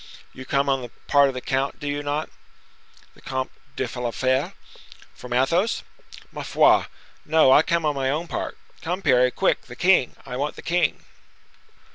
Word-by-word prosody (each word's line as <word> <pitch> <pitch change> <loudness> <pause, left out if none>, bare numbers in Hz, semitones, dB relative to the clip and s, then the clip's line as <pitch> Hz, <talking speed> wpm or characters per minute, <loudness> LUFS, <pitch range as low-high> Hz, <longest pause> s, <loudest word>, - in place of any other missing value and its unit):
"You 130 - -10
come 140 +1 +1
on 135 -1 +1
the 120 - -7 0.2
part 140 -1 +5
of 135 - -3
the 125 - -4
count, 135 +2 -2
do 145 - -6
you 145 0 -2
not?" 145 +2 -2 0.9
"The - - -20
Comte 130 0 -3 0.2
de 130 - -2
la 120 - -1
Fere?" 130 +2 0 0.6
"From 125 - -11
Athos?" 165 - +1 0.5
"Ma - - -6
foi! - - +4 0.4
no; 155 -3 +4
I 145 - +7
come 170 0 0
on 150 - +2
my 135 -1 -1
own 155 +5 -2
part. - - -4 0.2
Come, 180 +4 -3
Parry, 125 -3 +4
quick! - - 0
The 120 - -10
king—I 130 -7 +1
want 145 +2 -2
the - - -11
king." 175 +1 0
140 Hz, 175 wpm, -23 LUFS, 130-155 Hz, 0.9 s, I